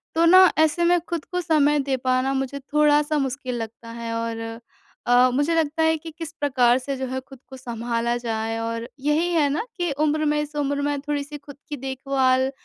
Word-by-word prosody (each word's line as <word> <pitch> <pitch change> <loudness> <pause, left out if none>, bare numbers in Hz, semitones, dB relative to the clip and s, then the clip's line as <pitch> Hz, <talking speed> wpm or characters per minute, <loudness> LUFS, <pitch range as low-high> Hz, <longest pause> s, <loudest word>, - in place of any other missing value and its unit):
तो 330 +1 +4
ना 370 +1 +8
ऐसे 315 +2 +3
में 350 +1 +4
खुद 340 -3 -3
को 360 0 -3
समय 295 -3 +3
दे 270 -1 -1
पाना 255 +1 0
मुझे 270 +1 -2
थोड़ा-सा 300 +1 +2
मुश्किल 265 -2 -2
लगता 230 +1 -8
है 230 0 -5
और 230 0 -3 0.7
अ, 245 +1 +5
मुझे 290 +5 +1
लगता 320 0 +1
है 320 0 +3
कि 325 +1 -9
किस 330 -2 -6
प्रकार 255 -4 +3
से 270 +2 -4
जो 265 - -3
है 260 +1 -3
खुद 265 0 -14
को 265 - -9
संभाला 235 -1 -2
जाए? 225 -1 -3
और 230 +1 -3
यही 300 +5 +1
है 310 -4 +3
ना 310 +11 -2
कि 350 -3 -1
उम्र 310 0 +1
में 300 0 +1
इस 300 0 -7
उम्र 285 -1 -1
में 290 0 -1
थोड़ी-सी 290 0 -4
खुद 285 -1 -13
की 295 - -3
देखभाल 265 0 0
280 Hz, 205 wpm, -23 LUFS, 255-300 Hz, 0.7 s, ना